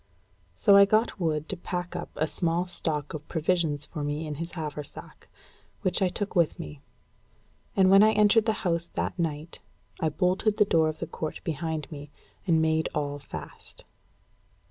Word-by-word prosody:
So 200 -2 +5
I 200 0 +9
got 215 +1 +1
Wood 155 -3 0
to - - -2
pack 175 0 -4
up - - -4
a 155 - +1
small 170 +2 0
stock 155 -5 -3
of 150 -1 -7
provisions 160 -3 0
for 150 -3 -6
me 145 +2 -2
in 150 - -4
his 170 +1 -5
haversack, 150 -4 -7 0.6
which 185 - +1
I 190 - +4
took 205 +3 -4
with 170 -3 +3
me; 75 -2 -8 0.9
and 190 -1 +5
when 195 +1 +8
I 215 +1 +6
entered 210 +1 +5
the 220 - +2
house 170 -1 0
that - - -2
night, 160 0 -3 0.4
I 160 - +1
bolted 185 +6 +1
the 210 - +5
door 160 -4 +3
of 155 - -5
the - - -4
court 155 - -5
behind 160 -1 -3
me, 145 -1 -8 0.4
and 165 -2 +4
made 160 0 +1
all 145 -1 -2
fast. 80 - -10
165 Hz, 175 wpm, -27 LUFS, 150-185 Hz, 0.9 s, I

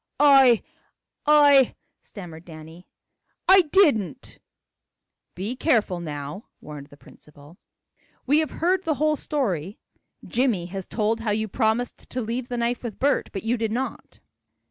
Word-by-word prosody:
"I 270 -5 +6 0.6
I 285 -3 +5
" - - -52
stammered 170 -5 -11
Danny, 160 +1 -13 0.6
"I 380 0 +8
didn't 230 - +1 0.5
" - - -58
"Be 205 +7 -4
careful 225 - +1
now," 150 +3 -7
warned 150 -2 -10
the 145 - -17
principal. 150 +3 -18 0.7
"We 290 +4 +3
have 315 - -1
heard 365 +2 0
the 315 -3 0
whole 305 +2 +1
story. 205 - -3 0.5
Jimmie 235 -8 0
has 190 +1 -7
told 225 0 -1
how 225 -1 -3
you 220 +1 -1
promised 225 +2 -2
to 255 - -4
leave 235 +2 -4
the 245 - -4
knife 235 +1 -1
with 235 -5 -7
Bert, 285 +2 0
but 195 - -6
you 235 +2 0
did 225 -1 -2
not." 260 +4 -5
225 Hz, 145 wpm, -24 LUFS, 175-270 Hz, 0.7 s, I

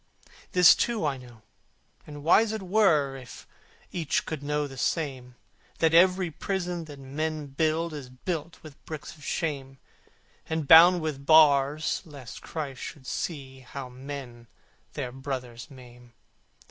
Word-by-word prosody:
This 180 -1 +8
too 230 -8 -1
I 140 -2 -1
know 120 -4 -15 0.6
and 145 -1 -9
wise 210 +7 +4
it 215 -3 -4
were 175 -9 +3
If 130 -2 -11 0.5
each 165 -5 -1
could 155 -3 -5
know 150 +1 -1
the 135 -2 -9
same 130 -3 -3 0.4
That 160 -1 +2
every 180 0 +4
prison 175 -1 -3
that 145 -2 -11
men 150 +3 -4
build 155 +4 -1
Is 140 -4 -7
built 160 +5 -5
with 155 -2 -14
bricks 155 -1 -7
of 150 - -17
shame, 140 -5 -3 0.7
And 160 -2 -2
bound 170 +3 +8
with 145 -3 -4
bars 150 -1 +4
lest 140 -7 -11
Christ 140 -5 -6
should 140 -3 -8
see 135 -2 -5
How 130 0 -8
men 130 -2 -9 0.5
their 125 - -4
brothers 130 -2 -6
maim. 125 -3 -15
145 Hz, 140 wpm, -27 LUFS, 135-160 Hz, 0.7 s, This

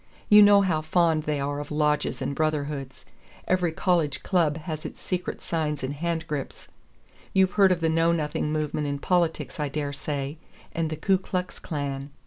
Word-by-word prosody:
You 210 0 +9
know 205 -1 +7
how 170 -5 +1
fond 160 -1 +2
they 150 -1 -1
are 145 +1 -2
of 145 - -6
lodges 150 0 0
and - - -2
brotherhoods. 145 -3 -2 0.4
Every 180 -2 +2
college 165 -3 0
club 165 -5 +2
has 155 -1 -5
its - - -8
secret 180 -1 -4
signs 150 -4 -2
and 130 +2 -2
handgrips. 160 -2 -4 0.7
You've 190 -1 +4
heard 195 -2 +5
of 175 -2 +1
the 165 - +2
Know 165 +1 +3
Nothing 150 -2 -1
movement 150 -1 -1
in 140 0 -2
politics, 170 +1 0
I 145 -1 -1
dare 145 0 -3
say, 140 +1 -4 0.3
and 165 -1 -1
the 155 - -3
Ku 190 +4 +2
Klux 185 -1 -4
Klan. 140 -2 -4
155 Hz, 175 wpm, -26 LUFS, 145-170 Hz, 0.7 s, You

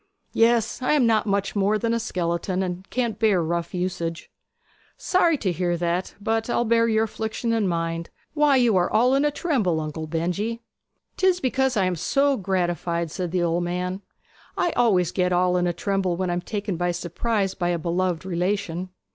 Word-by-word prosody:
'Yes, 230 +1 +2
I 255 - +2
am 285 -5 +4
not 220 -2 +2
much 200 0 0
more 205 +1 +2
than 230 +1 -1
a 230 - +1
skeleton, 180 -2 -2
and 180 +1 -5
can't 235 -4 -2
bear 215 -4 +3
rough 170 +1 -2
usage.' 170 -2 -3 0.7
'Sorry 345 -4 +2
to 200 -8 -1
hear 175 0 -1
that; 175 +2 -2
but 225 +2 -1
I'll 240 - +1
bear 230 0 +3
your 220 -1 +2
affliction 225 +1 -3
in 220 -3 +1
mind. 165 -1 -2 0.2
Why, 295 -2 +4
you 240 -5 +4
are 180 - +2
all 245 +4 +4
in 275 +1 +3
a - - +4
tremble, 255 - 0
Uncle 155 0 -5
Benjy!' 185 +9 -2 0.5
''Tis 375 -1 +3
because 265 -2 +1
I 195 - +3
am 185 -1 0
so 275 - +2
gratified,' 175 -4 -1
said 180 +1 -3
the 180 0 0
old 170 +1 +1
man. 180 +2 -3 0.6
'I 350 - +1
always 190 - +2
get 180 -1 0
all 180 0 +2
in 180 0 +1
a - - +1
tremble 190 -1 -1
when 185 -1 -1
I - - 0
am 175 - -1
taken 200 -2 -3
by 175 +1 0
surprise 190 +4 -1
by 175 -1 -1
a 175 - +1
beloved 175 +1 -1
relation.' 185 0 -2
190 Hz, 190 wpm, -24 LUFS, 175-230 Hz, 0.7 s, am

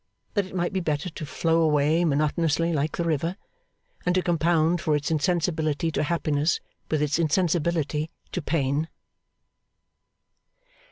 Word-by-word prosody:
that 205 -4 0
it 190 - -11
might 175 0 -1
be 190 - +1
better 160 +1 -2
to 155 -1 -7
flow 165 +3 +1
away 155 +1 +3
monotonously, 160 +2 +1
like 150 0 -1
the 170 - 0
river, 165 +2 -1 0.7
and 180 - +1
to 185 - +2
compound 170 0 +2
for 155 -2 +1
its 145 +1 -1
insensibility 160 -1 0
to - - -1
happiness 155 -1 +1 0.3
with 155 -1 +1
its 150 +2 0
insensibility 160 -2 +1 0.2
to 180 - -2
pain. 145 0 0
160 Hz, 135 wpm, -25 LUFS, 150-170 Hz, 0.7 s, away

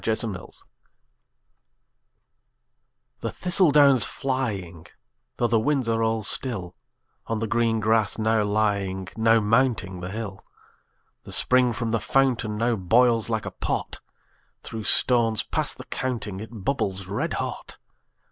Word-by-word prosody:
Autumn 110 -2 0 2.8
The - - -4
thistle 180 -1 +2
down's 140 -5 +5
flying, 105 - -3 0.5
though 120 - 0
the 115 -1 +2
winds 135 +1 0
are 115 0 0
all 110 -1 0
still, 95 -6 +1 0.5
On 115 - -2
the 110 - -2
green 115 0 0
grass 110 -1 +1
now 110 -1 +1
lying, 100 -3 -1
now 115 0 +3
mounting 110 -4 0
the 90 +1 -6
hill, 100 -2 -7 0.8
The - - -12
spring 125 -1 +3
from 115 0 -3
the 115 - 0
fountain 120 -3 0
now 115 +1 +1
boils 115 +4 +2
like 110 -2 -2
a - - -5
pot; - - -4 0.6
Through 110 -2 -7
stones 115 -3 +5
past - - -2
the - - -9
counting 115 -7 -4
it 110 - -8 0.2
bubbles 100 -8 -2
red 100 +3 -3
hot. - - -5
115 Hz, 130 wpm, -24 LUFS, 105-120 Hz, 2.8 s, down's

